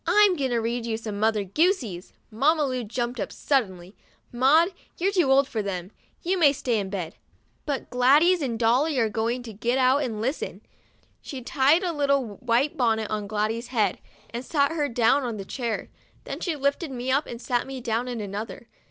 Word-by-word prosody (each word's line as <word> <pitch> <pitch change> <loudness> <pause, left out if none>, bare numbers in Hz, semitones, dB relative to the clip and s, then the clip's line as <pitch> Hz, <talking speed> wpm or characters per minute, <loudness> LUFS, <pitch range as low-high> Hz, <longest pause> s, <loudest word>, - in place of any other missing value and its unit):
"I'm 415 -3 +5
going 275 -5 -1
to 240 - 0
read 230 +1 -2
you 220 -1 -1
some 215 -2 -6
Mother 215 -1 +2
Goosies." 225 - 0 0.2
Mamma 295 +7 +2
Lu 255 -2 -2
jumped 240 +2 -3
up - - -3
suddenly, 190 -9 -1 0.2
' - - -40
Maud, 285 +8 +4 0.3
you're 380 +3 +1
too 355 -9 +2
old 275 0 +5
for 225 -5 -2
them; 185 -2 -4 0.3
you 370 +2 0
may 290 -4 +6
stay 245 -5 -1
in 195 -1 -3
bed, 185 -4 -5 0.5
but 285 -2 -2
Gladys 290 +8 +4
and 245 -5 -2
Dolly 255 +6 +2
are 225 -3 +2
going 230 +3 -1
to 225 -2 -8
get 235 +5 0
out 260 +2 +4
and 225 -6 -3
listen." 260 +8 -3 0.6
She 260 -3 -7
tied 285 +8 +3
a 350 -2 -1
little 280 -7 0
white 250 +4 +1
bonnet 220 -3 +1
on 210 -1 -2
Gladys' 215 +3 -2
head, 225 -5 0 0.3
and 235 +2 -5
sat 280 +2 +1
her 300 -3 -1
down 240 +3 +3
on 230 -4 -4
a 195 - -6
chair. 235 0 -4 0.3
Then - - -6
she 340 -4 -2
lifted 280 +3 -1
me 255 0 -3
up, 280 +3 +1
and 235 - -7
sat 245 0 -1
me 270 -1 -6
down 235 0 -1
in 245 -2 -4
another. 210 +3 -6
245 Hz, 200 wpm, -25 LUFS, 220-280 Hz, 0.6 s, may